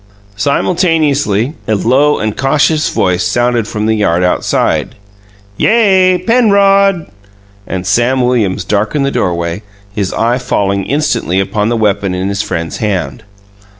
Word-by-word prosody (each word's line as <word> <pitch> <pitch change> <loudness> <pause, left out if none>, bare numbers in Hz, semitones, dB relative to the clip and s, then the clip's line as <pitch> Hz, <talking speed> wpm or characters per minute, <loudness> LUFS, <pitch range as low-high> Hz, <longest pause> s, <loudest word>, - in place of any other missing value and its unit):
Simultaneously, 145 - 0
a 110 - +1
low 135 +8 +2
and 110 -1 -3
cautious 150 +3 +1
voice 90 -1 0
sounded 120 -2 0
from 105 -1 -3
the 110 - +2
yard 90 -5 +1
outside, 90 - 0 0.6
"Yay, 190 -5 +3
Penrod!" 200 -4 +2 0.6
and 95 -1 -4
Sam 120 +6 +1
Williams 120 -7 0
darkened 110 +8 -1
the 140 - -1
doorway, 85 -1 -2 0.3
his 100 -3 -2
eye 120 +3 0
falling 100 -5 -1
instantly 140 - 0
upon 105 +2 -1
the 120 - 0
weapon 100 -3 0
in 95 +2 -2
his 100 0 -2
friend's 85 -6 -4
hand. 105 +2 -3
115 Hz, 130 wpm, -12 LUFS, 100-150 Hz, 0.6 s, Yay